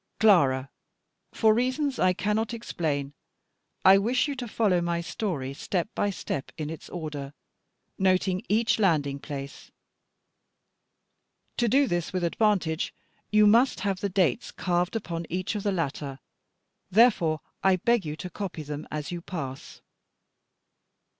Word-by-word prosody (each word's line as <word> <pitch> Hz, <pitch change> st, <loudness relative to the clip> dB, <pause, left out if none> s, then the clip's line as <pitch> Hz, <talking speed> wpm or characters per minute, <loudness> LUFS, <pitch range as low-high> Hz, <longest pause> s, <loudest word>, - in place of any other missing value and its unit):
Clara, 140 Hz, -11 st, +4 dB, 0.6 s
for 220 Hz, -2 st, +4 dB
reasons 255 Hz, +4 st, 0 dB
I 185 Hz, -, +4 dB
cannot 215 Hz, +5 st, -1 dB
explain, 145 Hz, -10 st, -3 dB, 0.7 s
I 195 Hz, +1 st, +8 dB
wish 245 Hz, +8 st, +1 dB
you 285 Hz, -, -2 dB
to 245 Hz, -2 st, -4 dB
follow 205 Hz, -5 st, +2 dB
my 170 Hz, 0 st, -1 dB
story 170 Hz, -, -3 dB
step 175 Hz, +6 st, -2 dB
by 205 Hz, -, 0 dB
step 145 Hz, -7 st, -4 dB
in 155 Hz, -1 st, -4 dB
its 160 Hz, -, -9 dB
order, 150 Hz, -5 st, -6 dB, 0.6 s
noting 185 Hz, 0 st, +2 dB
each 225 Hz, +2 st, +2 dB
landing 145 Hz, -8 st, +2 dB
place. 140 Hz, -1 st, -7 dB, 1.9 s
To 240 Hz, -, +2 dB
do 275 Hz, +5 st, +4 dB
this 175 Hz, -7 st, -2 dB
with 185 Hz, -1 st, -2 dB
advantage, 170 Hz, -3 st, +1 dB, 0.3 s
you 210 Hz, 0 st, +5 dB
must 230 Hz, +4 st, +4 dB
have 195 Hz, -1 st, -1 dB
the 200 Hz, -, -1 dB
dates 190 Hz, +4 st, +1 dB
carved 175 Hz, +2 st, -1 dB
upon 170 Hz, -6 st, -4 dB
each 185 Hz, +2 st, -2 dB
of 210 Hz, -, -3 dB
the 205 Hz, -, 0 dB
latter: 145 Hz, -6 st, -3 dB, 0.7 s
therefore 185 Hz, -, +4 dB, 0.2 s
I 190 Hz, -1 st, +5 dB
beg 235 Hz, +4 st, +2 dB
you 150 Hz, -1 st, -4 dB
to 180 Hz, -, -7 dB
copy 180 Hz, -4 st, -5 dB
them 150 Hz, +1 st, -6 dB
as 150 Hz, +1 st, -4 dB
you 175 Hz, -1 st, -4 dB
pass. 140 Hz, -7 st, -7 dB
185 Hz, 140 wpm, -27 LUFS, 155-210 Hz, 1.9 s, I